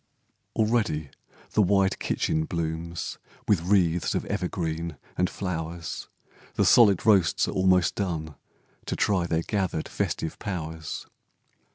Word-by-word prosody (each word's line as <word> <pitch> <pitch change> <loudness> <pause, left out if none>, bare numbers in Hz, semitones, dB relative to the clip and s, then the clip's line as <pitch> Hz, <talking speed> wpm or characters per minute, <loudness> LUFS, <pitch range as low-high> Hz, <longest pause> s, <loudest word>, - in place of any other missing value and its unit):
Already 105 - +1 0.4
the 110 - +3
wide 95 0 +3
kitchen 80 0 0
blooms 85 0 -3 0.3
With 100 -6 +3
wreaths 90 -2 +2
of - - -1
evergreens 85 -4 -2 0.2
and 90 0 +1
flowers, 85 -3 -4 0.5
The - - +3
solid 105 -6 +6
roasts 100 -7 +4
are - - -2
almost 95 -1 +3
done, 80 -6 -3 0.5
To - - -1
try 95 -5 +1
their 80 0 0
gathered 95 -6 -1
festive 80 - -3
powers. 80 -6 -5
90 Hz, 120 wpm, -27 LUFS, 80-100 Hz, 0.5 s, solid